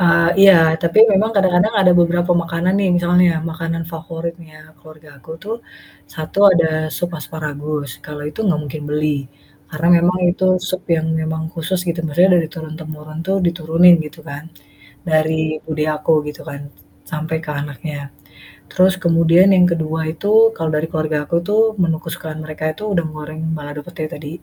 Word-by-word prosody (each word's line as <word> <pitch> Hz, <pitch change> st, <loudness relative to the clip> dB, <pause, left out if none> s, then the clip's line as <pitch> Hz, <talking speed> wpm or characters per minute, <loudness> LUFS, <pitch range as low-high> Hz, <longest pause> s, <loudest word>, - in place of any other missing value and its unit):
Eee, 170 Hz, -1 st, +4 dB
iya 195 Hz, 0 st, +9 dB, 0.3 s
tapi 170 Hz, +4 st, +1 dB
memang 210 Hz, +3 st, +2 dB
kadang-kadang 190 Hz, +3 st, +2 dB
ada 180 Hz, -2 st, +5 dB
beberapa 175 Hz, +1 st, +2 dB
makanan 170 Hz, +2 st, -1 dB
nih 195 Hz, -, +1 dB
misalnya 175 Hz, 0 st, +3 dB, 0.2 s
makanan 165 Hz, 0 st, -4 dB
favoritnya 165 Hz, 0 st, -7 dB, 0.2 s
keluarga 155 Hz, 0 st, -16 dB
aku 135 Hz, -, -15 dB
tuh, 215 Hz, +3 st, -4 dB, 0.6 s
1 155 Hz, +5 st, -6 dB
ada 170 Hz, -2 st, +3 dB, 0.3 s
sup 175 Hz, -, -2 dB
asparagus, 150 Hz, -1 st, -5 dB, 0.2 s
kalau 150 Hz, -1 st, -8 dB
itu 150 Hz, -, -12 dB
enggak 175 Hz, -7 st, +1 dB
mungkin 150 Hz, +1 st, -7 dB
beli, 150 Hz, +1 st, 0 dB, 0.6 s
karena 160 Hz, +1 st, -3 dB
memang 180 Hz, +2 st, +1 dB
itu 185 Hz, +1 st, -2 dB, 0.2 s
sup 185 Hz, 0 st, -3 dB
yang 160 Hz, 0 st, -2 dB
memang 160 Hz, 0 st, -3 dB
khusus 170 Hz, +3 st, -2 dB
gitu 170 Hz, 0 st, -2 dB
maksudnya 175 Hz, +5 st, +3 dB
dari 165 Hz, -2 st, +1 dB
turun-temurun 155 Hz, -2 st, -9 dB
tuh 195 Hz, +1 st, +1 dB
diturunin 170 Hz, +1 st, +4 dB
gitu 150 Hz, +2 st, -12 dB
kan, 145 Hz, +2 st, -8 dB, 0.6 s
dari 155 Hz, 0 st, +2 dB, 0.3 s
bude 155 Hz, -1 st, -2 dB
aku 155 Hz, +2 st, 0 dB, 0.2 s
gitu 150 Hz, -, -8 dB
kan, 140 Hz, -, -7 dB, 0.5 s
s -, -, -15 dB
sampai 160 Hz, +1 st, -3 dB
ke 150 Hz, -, -6 dB
anaknya, 145 Hz, +1 st, -6 dB, 0.8 s
terus 185 Hz, +1 st, +3 dB
kemudian 170 Hz, +2 st, +4 dB
yang 180 Hz, -1 st, +5 dB
ke-2 160 Hz, -1 st, -2 dB
itu 165 Hz, +6 st, -6 dB, 0.3 s
kalau 160 Hz, -1 st, -2 dB
dari 155 Hz, +2 st, -1 dB
keluarga 155 Hz, -2 st, -1 dB
aku -, -, -1 dB
tuh, 210 Hz, +1 st, +2 dB, 0.2 s
menu 165 Hz, -2 st, +1 dB
kesukaan 160 Hz, -1 st, -6 dB
mereka 155 Hz, 0 st, -8 dB
itu 155 Hz, -, -13 dB
udang 170 Hz, -3 st, 0 dB
goreng 155 Hz, +1 st, -8 dB, 0.2 s
balado 145 Hz, 0 st, -7 dB
pete 175 Hz, -2 st, -7 dB
tadi, 145 Hz, 0 st, -8 dB
165 Hz, 165 wpm, -18 LUFS, 155-175 Hz, 0.8 s, iya